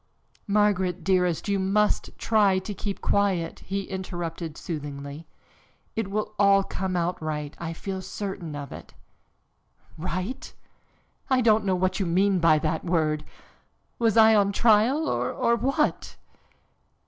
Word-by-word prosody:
"Margaret, 195 -4 +1
dearest, 180 -2 +1
you 200 -1 +1
must 205 +2 +1
try 205 -4 +3
to 190 +3 -4
keep 200 0 -5
quiet," 190 -5 0
he 195 +1 -4
interrupted 175 -4 -5
soothingly. 145 -1 -6 0.7
"It 225 -3 -2
will 215 +1 -2
all 200 -1 +5
come 190 -1 -3
out 175 0 -1
right, 150 -2 -4
I 165 -1 -4
feel 190 +3 -5
certain 190 -6 -5
of 140 -2 -7
it." - - -11 1.0
"Right? 185 +7 -4 0.7
I 260 -1 +3
don't 220 -2 +3
know 190 -1 +2
what 185 +2 0
you 195 - 0
mean 190 +2 +2
by 165 -2 +5
that 155 +1 -1
word. 155 -3 0 0.8
Was 230 -2 +2
I 220 0 +7
on 200 -2 +3
trial, 235 +9 +3
or 235 - +1
what?" 275 +5 -1
190 Hz, 135 wpm, -26 LUFS, 165-210 Hz, 1.0 s, I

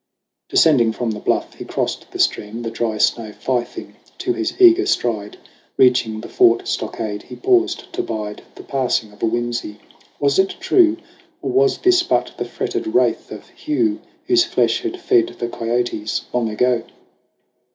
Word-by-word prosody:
Descending 120 -8 +4
from 115 0 -2
the 105 - -5
bluff, - - -1
he - - -9
crossed - - -3
the - - -8
stream, 110 +3 0
The 115 - -4
dry 115 -1 -2
snow 110 0 +1
fifing 120 +2 -3 0.2
to 365 - -1
his 350 +1 -3
eager 365 0 +6
stride. 110 -4 -1 0.4
Reaching 120 -4 +3
the - - -8
fort 115 0 +3
stockade, 105 -2 -3
he - - -11
paused 370 -2 +1
to 370 - -1
bide 105 - -5
The - - -11
passing 125 -5 -1
of 105 - -19
a - - +2
whimsy. 120 -2 -2 0.4
Was 140 +2 +2
it 190 0 +2
true? 360 -3 +4 0.5
Or - - -1
was 405 +1 +3
this 365 -1 +4
but 350 - 0
the - - -1
fretted 380 -4 -3
wraith 335 +3 +1
of - - -10
Hugh 320 +1 -1 0.2
Whose 360 0 +4
flesh 360 +2 +1
had 365 0 -4
fed 360 -1 +2
the 120 - -2
kiotes 115 -2 -2
long 120 -2 0
ago 120 +2 +1
125 Hz, 165 wpm, -20 LUFS, -, 0.5 s, eager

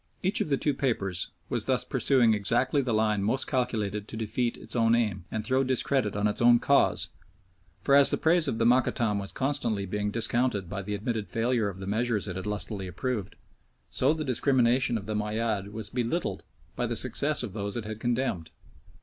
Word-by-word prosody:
Each 190 +2 +2
of - - -1
the 140 - +2
two 145 - 0
papers 100 -10 -1 0.2
was - - 0
thus - - +1
pursuing 120 -5 +3
exactly 120 +7 +1
the 125 -3 -2
line 110 -2 +1
most 115 +7 0
calculated 105 -5 -2
to 110 - -8
defeat 115 +2 -2
its - - -5
own 115 -1 +3
aim, 105 -6 -1
and 110 -1 -4
throw 130 +3 +2
discredit 130 -4 +1
on 105 0 0
its 105 - -2
own 120 0 +7
cause, 140 +4 +2 0.7
for 140 - +2
as 140 0 +7
the - - +1
praise 165 0 +3
of 115 - -1
the 115 - +1
Mokattam 120 -3 +2
was 100 -1 -5
constantly 130 -7 -1
being 105 +2 -2
discounted 115 -2 0
by 100 +3 -5
the 105 +2 -4
admitted 110 0 -3
failure 115 -2 0
of 95 - -8
the 95 - -6
measures 110 +1 -1
it 90 - -5
had 95 +2 -5
lustily 105 -2 -3
approved, 105 +3 -4 0.6
so 135 +3 +2
the 155 -1 -2
discrimination 125 -2 +2
of 100 - -7
the 110 - -3
Moayyad 105 -1 -2
was 110 -1 -5
belittled 125 +8 -2 0.3
by - - -1
the - - -3
success 145 -2 +1
of 110 -6 -5
those 100 +1 -4
it 115 - -5
had 110 0 -6
condemned. 120 -8 -1
115 Hz, 200 wpm, -28 LUFS, 105-130 Hz, 0.7 s, own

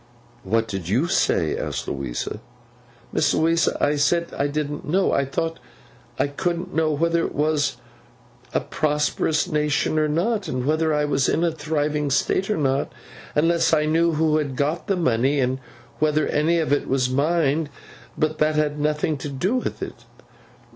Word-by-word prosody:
'What 115 +3 +1
did 95 -5 -5
you 125 - +2
say?' 80 - +1
asked - - -4
Louisa. 70 +8 -4 0.7
'Miss 155 - +2
Louisa, 165 0 +2
I 145 +1 +2
said 170 +4 +2
I 140 - 0
didn't 145 0 -3
know. 185 +5 +1
I 140 - +2
thought 165 +4 -3 0.6
I - - +2
couldn't 175 +5 -3
know 160 -1 +2
whether 170 +3 +1
it - - -4
was 150 0 +1 0.7
a - - 0
prosperous 150 +1 0
nation 150 -1 +1
or 155 - +2
not, 195 +8 0
and 125 0 -2
whether 155 +2 +1
I 150 -1 +1
was 140 -2 +1
in 165 - +1
a 170 - +2
thriving 150 -2 -1
state 185 +8 +1
or 210 - +1
not, 135 -2 0 0.4
unless 165 +2 +3
I 150 -1 +1
knew 165 +2 +2
who 155 0 +2
had 145 -4 -2
got 150 +8 -1
the 195 -3 +1
money, 135 -2 +2
and 130 0 0 0.4
whether 155 0 +2
any 160 +3 +2
of 155 -3 +1
it 145 - 0
was 130 -1 +1
mine. 150 +2 +1 0.5
But 155 0 0
that 155 0 +2
had 150 -1 0
nothing 150 0 0
to 145 +2 -6
do 175 - -1
with - - -3
it. - - -8
150 Hz, 170 wpm, -23 LUFS, 140-165 Hz, 0.7 s, unless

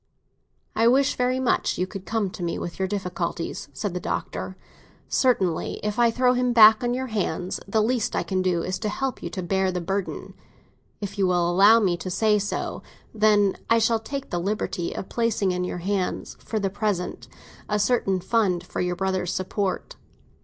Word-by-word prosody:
"I 230 - +4
wish 265 +3 +4
very 250 +1 +1
much 260 - +1
you 180 - 0
would 195 -1 -7
come 215 -4 -1
to - - -9
me 170 -1 -2
with 170 +1 -6
your 190 - +1
difficulties," 180 -2 -3
said 205 -4 -4
the 180 - -2
Doctor. 185 +1 -4 0.5
"Certainly, 190 -11 +1
if 210 +2 -2
I 235 -1 +5
throw 250 +2 +3
him 250 -1 +1
back 220 0 +8
on 245 0 0
your 260 +1 -2
hands, 185 -3 -2
the 215 +2 +2
least 235 0 0
I - - +1
can 190 -1 -1
do 180 -2 +1
is 185 0 -3
to 215 - -2
help 265 +4 -3
you - - -4
to 185 - -5
bear 190 +1 +1
the 180 - -2
burden. 190 +2 -3 0.7
If 200 0 -5
you 190 - +3
will 175 -1 +2
allow 200 +6 +6
me 185 -5 +1
to 180 +2 -5
say 210 +3 +2
so, 205 0 -3 0.3
then, 210 -2 +3
I 230 - +5
shall 225 0 +2
take 275 +5 -6
the 175 - 0
liberty 185 -2 -2
of - - -5
placing 225 -5 0
in 180 0 -1
your 180 - -3
hands, 195 -2 -2
for 220 - -3
the 195 -2 -1
present, 205 -3 -2 0.4
a 210 - +1
certain 205 -4 +1
fund 190 -3 +1
for - - -4
your 180 0 -1
brother's 185 -1 -1
support." 190 - -2
200 Hz, 195 wpm, -25 LUFS, 180-225 Hz, 0.7 s, back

